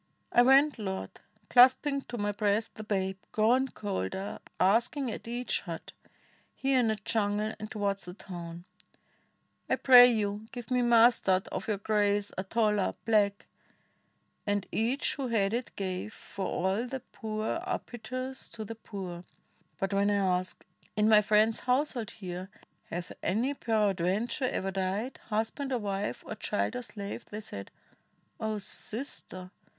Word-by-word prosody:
"I 240 Hz, -, +6 dB
went, 270 Hz, +2 st, +5 dB
Lord, 190 Hz, -2 st, -4 dB, 0.3 s
clasping 260 Hz, +3 st, +6 dB
to 240 Hz, -, -4 dB
my 205 Hz, -1 st, 0 dB
breast 205 Hz, +1 st, 0 dB
The 215 Hz, -, -8 dB
babe, 190 Hz, -2 st, -1 dB
grown 245 Hz, +5 st, +3 dB
colder, 190 Hz, -, -4 dB, 0.2 s
asking 230 Hz, +7 st, +2 dB
at -, -, -7 dB
each 245 Hz, +1 st, -1 dB
hut -, -, -7 dB, 0.3 s
— -, -, -35 dB
Here 270 Hz, -1 st, +2 dB
in 240 Hz, -, +3 dB
the 220 Hz, -, +2 dB
jungle 210 Hz, 0 st, 0 dB
and 215 Hz, -, -6 dB
towards 200 Hz, -2 st, -2 dB
the 180 Hz, 0 st, -8 dB
town 175 Hz, -3 st, -8 dB, 0.6 s
— -, -, -43 dB
^I -, -, +2 dB
pray 250 Hz, -1 st, +10 dB
you, 210 Hz, -1 st, -1 dB
give 245 Hz, -1 st, -8 dB
me 250 Hz, 0 st, +3 dB
mustard, 230 Hz, -5 st, +5 dB
of -, -, -4 dB
your 210 Hz, -2 st, 0 dB
grace, 205 Hz, 0 st, +1 dB
A 190 Hz, -, -2 dB
tola 210 Hz, -1 st, +1 dB
— -, -, -44 dB
black'; 205 Hz, -2 st, +2 dB, 1.0 s
and 205 Hz, -1 st, +1 dB
each 240 Hz, +6 st, +1 dB
who 270 Hz, -2 st, -2 dB
had 215 Hz, -3 st, +1 dB
it 240 Hz, +1 st, -3 dB
gave, 190 Hz, +2 st, -4 dB
For 195 Hz, -, -5 dB
all 190 Hz, +7 st, 0 dB
the 265 Hz, +1 st, -5 dB
poor 220 Hz, -2 st, -3 dB
are -, -, -1 dB
piteous 255 Hz, +2 st, -6 dB
to 220 Hz, -, -5 dB
the 225 Hz, -, -5 dB
poor; 190 Hz, -6 st, -7 dB, 0.6 s
But 195 Hz, +1 st, -1 dB
when 200 Hz, +1 st, +3 dB
I 205 Hz, -, +2 dB, 0.2 s
asked, 185 Hz, -1 st, -9 dB, 0.3 s
'In 210 Hz, +1 st, +4 dB
my 215 Hz, -1 st, +8 dB
friend's 215 Hz, +2 st, +3 dB
household 250 Hz, -3 st, 0 dB
here 185 Hz, -2 st, -7 dB, 0.4 s
Hath 175 Hz, +1 st, -5 dB
any 235 Hz, +9 st, +1 dB
peradventure 215 Hz, -, 0 dB
ever 195 Hz, -6 st, -1 dB
died 195 Hz, +6 st, -2 dB
— -, -, -26 dB
Husband 225 Hz, +6 st, -1 dB
or 255 Hz, -, +2 dB
wife, 200 Hz, -2 st, -3 dB
or -, -, -5 dB
child, 215 Hz, +2 st, -1 dB
or 250 Hz, -, -2 dB
slave?' 205 Hz, -4 st, -6 dB
they 210 Hz, -, -7 dB
said: 100 Hz, -, -7 dB, 0.7 s
'0 220 Hz, -1 st, -1 dB
Sister! 200 Hz, -4 st, -6 dB
215 Hz, 160 wpm, -30 LUFS, 195-240 Hz, 1.0 s, pray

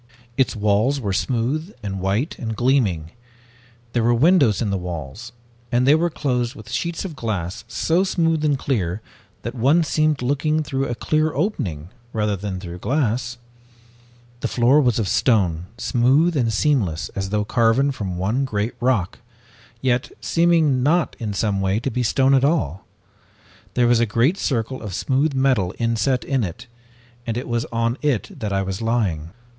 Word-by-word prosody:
"Its 130 Hz, -1 st, +1 dB
walls 110 Hz, +6 st, +2 dB
were 100 Hz, -6 st, -2 dB
smooth 130 Hz, -, -1 dB
and 95 Hz, -2 st, -4 dB
white 100 Hz, -, -1 dB
and 110 Hz, -2 st, -3 dB
gleaming. 105 Hz, -, +1 dB, 0.8 s
There 120 Hz, -, +2 dB
were 120 Hz, +1 st, +3 dB
windows 140 Hz, -, +4 dB
in 110 Hz, -4 st, -1 dB
the -, -, 0 dB
walls, 90 Hz, -, -6 dB, 0.4 s
and 120 Hz, +1 st, +2 dB
they 140 Hz, -, +7 dB
were 170 Hz, +3 st, +2 dB
closed 125 Hz, -6 st, -1 dB
with 110 Hz, +1 st, -11 dB
sheets 165 Hz, +10 st, -2 dB
of 170 Hz, -5 st, -6 dB
glass 100 Hz, -4 st, -3 dB
so 165 Hz, +9 st, +1 dB
smooth 165 Hz, -4 st, +1 dB
and 145 Hz, -2 st, +2 dB
clear 105 Hz, -7 st, -2 dB, 0.4 s
that 115 Hz, -, -4 dB
one 135 Hz, +8 st, +3 dB
seemed 155 Hz, -3 st, +1 dB
looking 150 Hz, +4 st, +1 dB
through 135 Hz, -1 st, -2 dB
a 120 Hz, -, -3 dB
clear 155 Hz, +6 st, +1 dB
opening 85 Hz, -, -2 dB, 0.2 s
rather 105 Hz, -2 st, 0 dB
than 95 Hz, -1 st, -4 dB
through 90 Hz, -1 st, -8 dB
glass. 125 Hz, 0 st, -1 dB, 1.0 s
The -, -, -1 dB
floor 130 Hz, +5 st, +4 dB
was 125 Hz, -5 st, +2 dB
of 110 Hz, -4 st, 0 dB
stone, 90 Hz, -8 st, +1 dB
smooth 135 Hz, +8 st, +2 dB
and 120 Hz, -5 st, +1 dB
seamless 105 Hz, -, 0 dB
as 95 Hz, -1 st, -4 dB
though 105 Hz, 0 st, 0 dB
carven 120 Hz, +5 st, +2 dB
from 95 Hz, -9 st, -4 dB
one 105 Hz, +9 st, 0 dB
great 110 Hz, -3 st, -2 dB
rock, 120 Hz, -8 st, 0 dB, 0.6 s
yet 125 Hz, -1 st, 0 dB
seeming 165 Hz, -6 st, +2 dB
not, 160 Hz, +6 st, +2 dB
in 110 Hz, -3 st, -3 dB
some 100 Hz, -1 st, 0 dB
way, 95 Hz, +2 st, +1 dB
to 130 Hz, +3 st, -3 dB
be 125 Hz, -, -1 dB
stone 135 Hz, +3 st, +3 dB
at 135 Hz, -1 st, +4 dB
all. 120 Hz, -, 0 dB, 0.9 s
There 125 Hz, -, +3 dB
was 120 Hz, -1 st, +4 dB
a 120 Hz, -, +2 dB
great 125 Hz, -, +2 dB
circle 130 Hz, 0 st, -1 dB
of 105 Hz, -5 st, -5 dB
smooth 135 Hz, +5 st, 0 dB
metal 130 Hz, -9 st, +1 dB
inset 115 Hz, +2 st, 0 dB
in 135 Hz, -4 st, 0 dB
it, 100 Hz, +6 st, -6 dB, 0.6 s
and 115 Hz, 0 st, -1 dB
it 125 Hz, -, -4 dB
was 120 Hz, -1 st, -1 dB
on 115 Hz, +2 st, -1 dB
it 140 Hz, -2 st, -1 dB
that 105 Hz, -4 st, -3 dB
I 95 Hz, 0 st, 0 dB
was 95 Hz, +1 st, -4 dB
lying. 100 Hz, -9 st, -1 dB
120 Hz, 170 wpm, -22 LUFS, 105-140 Hz, 1.0 s, they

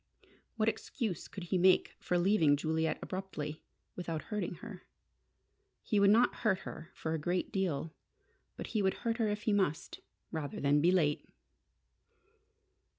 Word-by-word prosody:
What 220 Hz, -1 st, +1 dB
excuse 220 Hz, -, -2 dB
could 195 Hz, -, -8 dB
he 180 Hz, +1 st, 0 dB
make 185 Hz, +1 st, +4 dB
for 180 Hz, -, 0 dB
leaving 175 Hz, -6 st, +4 dB
Juliet 160 Hz, +2 st, 0 dB
abruptly, 155 Hz, -6 st, -5 dB, 0.3 s
without 165 Hz, -3 st, -4 dB
hurting 210 Hz, -5 st, -3 dB
her? 205 Hz, -3 st, -10 dB, 1.0 s
He 210 Hz, -4 st, +1 dB
would 200 Hz, 0 st, +6 dB
not 230 Hz, +4 st, +4 dB
hurt 210 Hz, -5 st, +1 dB
her 165 Hz, -, -8 dB
for 160 Hz, -, -3 dB
a 160 Hz, -, -1 dB
great 175 Hz, +4 st, -1 dB
deal. 165 Hz, -6 st, -1 dB, 0.6 s
But -, -, -5 dB
he 215 Hz, -, +2 dB
would 190 Hz, -1 st, +2 dB
hurt 230 Hz, 0 st, +1 dB
her 225 Hz, -3 st, +1 dB
if 210 Hz, 0 st, -3 dB
he 215 Hz, -, +2 dB
must, 185 Hz, -6 st, 0 dB, 0.3 s
rather 155 Hz, -4 st, -4 dB
than 145 Hz, +1 st, +3 dB
be 175 Hz, +3 st, +5 dB
late! 155 Hz, -6 st, +1 dB
185 Hz, 150 wpm, -33 LUFS, 160-210 Hz, 1.0 s, would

